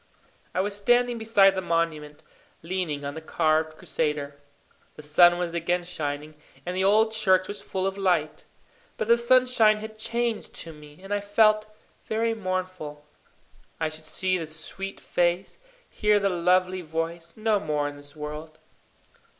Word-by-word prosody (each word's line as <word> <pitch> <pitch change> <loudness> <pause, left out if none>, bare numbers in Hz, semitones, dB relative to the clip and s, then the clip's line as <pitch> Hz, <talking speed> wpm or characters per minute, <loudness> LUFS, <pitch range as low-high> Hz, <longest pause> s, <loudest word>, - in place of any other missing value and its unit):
I 185 - +2
was 200 +1 -2
standing 240 +3 +2
beside 205 -3 +5
the 190 - -2
monument, 165 -4 -2 0.4
leaning 165 -5 -3
on 140 - -4
the 160 - -7
carved 155 0 +1
Crusader. 150 -5 -2 0.6
The 150 - -11
sun 175 +4 +6
was 175 -1 -2
again 175 +1 0
shining, 150 -3 -4 0.3
and 180 +1 -3
the 190 - +1
old 215 +3 +4
church 190 -4 +3
was 205 - -6
full 190 0 -3
of 195 +1 -2
light. 170 -6 0 0.5
But 215 - -2
the 235 - +6
sunshine 235 -3 +4
had 215 0 -9
changed 235 0 -2
to 165 - -8
me, 150 0 -15
and 195 +1 -4
I 205 - 0
felt 215 +1 +3 0.4
very 225 +1 0
mournful. 185 -7 -4 0.7
I 160 -1 0
should 155 0 -9
see 185 +3 -1
the 165 - -5
sweet 165 +5 -5
face, 175 - -1 0.3
hear 210 -1 +2
the 200 0 +1
lovely 185 +1 +2
voice, 165 +2 -4
no 215 -1 +2
more 150 -3 -1
in 145 - -6
this 145 0 -8
world. 150 +1 -7
180 Hz, 160 wpm, -26 LUFS, 155-205 Hz, 0.7 s, sun